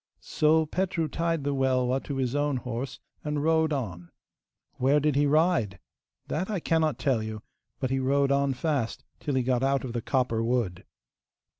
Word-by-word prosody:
So 155 +1 +3
Petru 175 0 -1
tied 165 0 -1
the 145 0 0
Welwa 130 -1 +1
to 140 - -4
his 130 -2 -1
own 145 -1 +1
horse 125 +1 -5 0.2
and 150 -1 -2
rode 160 0 +3
on. 90 - -4 0.7
Where 135 +4 +3
did 150 -1 +1
he 145 +1 +3
ride? 145 - +2 0.5
That 180 +6 -2
I 205 -3 -1
cannot 160 -2 +1
tell 130 -6 +1
you, 110 0 -6 0.4
but 130 -1 -1
he 135 - +1
rode 140 +1 +2
on 140 -1 +2
fast 140 -5 -1 0.2
till 145 - -2
he 130 - +2
got 125 -1 +1
out 135 0 +1
of 125 -3 -5
the 120 - -2
copper 120 -3 0
wood. 115 -7 -1
135 Hz, 175 wpm, -27 LUFS, 125-150 Hz, 0.7 s, So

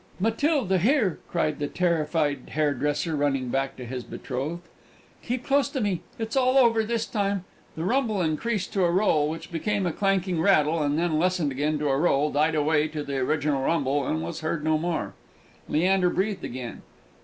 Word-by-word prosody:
"Matilda, 225 - +1
here!" 220 - +2
cried 155 -3 -1
the 145 - -1
terrified 155 -5 0
hairdresser, 150 +1 0
running 135 -3 0
back 135 +1 -1
to 125 - -8
his 125 +1 -5
betrothed; 145 +10 -5 0.6
"keep 250 +1 -3
close 280 0 +2
to 270 - -3
me. 200 -7 -1 0.2
It's 225 +1 -4
all 255 0 +3
over 230 -4 +5
this 230 +1 -1
time!" 200 -3 -1 0.3
The 160 - -4
rumble 225 0 +1
increased 185 +5 -1
to 195 - +2
a 175 - +3
roll, 170 -5 +2
which 160 +2 -7
became 200 +4 -1
a 175 - -1
clanking 190 -3 0
rattle, 160 -4 +3
and 145 0 +1
then 165 -2 +1
lessened 175 -4 +1
again 150 +3 0
to 150 -1 -1
a 135 - +2
roll, 150 -2 +2
died 155 +2 +2
away 150 0 +2
to 155 -1 -5
the 140 -1 -3
original 145 +1 0
rumble, 140 -2 0
and 80 +1 -1
was 85 - -5
heard 160 -1 -2
no 155 0 +2
more. 170 0 -2 0.6
Leander 180 +3 +3
breathed 195 0 -1
again. 125 -1 -6
165 Hz, 180 wpm, -26 LUFS, 145-195 Hz, 0.6 s, over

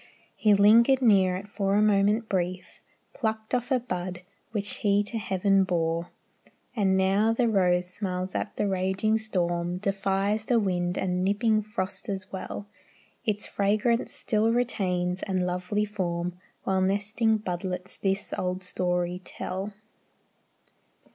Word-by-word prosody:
He 210 -2 +4
lingered 230 +6 +6
near 190 -5 +5
it 195 +2 -6
for 200 -1 0
a 210 - +4
moment 210 +2 +3
brief, 185 -1 -3 0.3
Plucked 220 -2 -3
off 245 0 0
a 260 -2 +3
bud, 180 -6 -5 0.3
which 210 -2 -2
he 205 0 +2
to 225 +2 -3
heaven 195 -1 +2
bore; 170 -2 -1 0.7
And 195 -4 +2
now 195 +4 +3
the 235 +1 +2
rose 180 -4 +2
smiles 185 -2 -3
at - - -3
the 205 - +1
raging 190 +3 +1
storm, 175 -4 -1
Defies 195 +2 0
the 240 -1 +3
wind 180 -3 -1
and 180 -1 0
nipping 215 +3 +2
frost 210 0 -4
as 195 -1 -4
well; 195 +1 -6 0.6
Its 210 -1 0
fragrance 215 +4 +1
still 220 +1 +1
retains, 185 -7 0
and 185 -2 -1
lovely 180 +4 -1
form, 180 -4 -2 0.3
While 190 -1 +1
nestling 205 +4 +1
budlets 180 -2 -4
this 195 0 -1
old 185 +1 -2
story 180 0 -1
tell. 190 +3 -5
195 Hz, 135 wpm, -27 LUFS, 180-215 Hz, 0.7 s, lingered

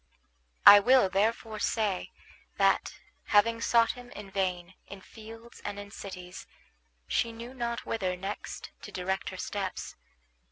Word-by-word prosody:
I 205 - +12
will 250 -1 +5
therefore 215 +2 0
say 210 -5 -1 0.5
that, - - +2 0.3
having 230 +2 +3
sought 230 -1 +4
him 245 -1 -12
in 200 -2 -9
vain 185 -2 -2
in 200 -1 -10
fields 225 +3 -13
and 205 - -5
in 205 0 -8
cities, 180 -3 -9 0.6
she 230 - 0
knew 235 +2 -9
not 235 -2 -3
whither 185 -5 -2
next 195 +3 -6
to - - -9
direct 190 +1 -2
her 185 - -8
steps. 195 0 -4
205 Hz, 135 wpm, -29 LUFS, 190-230 Hz, 0.6 s, I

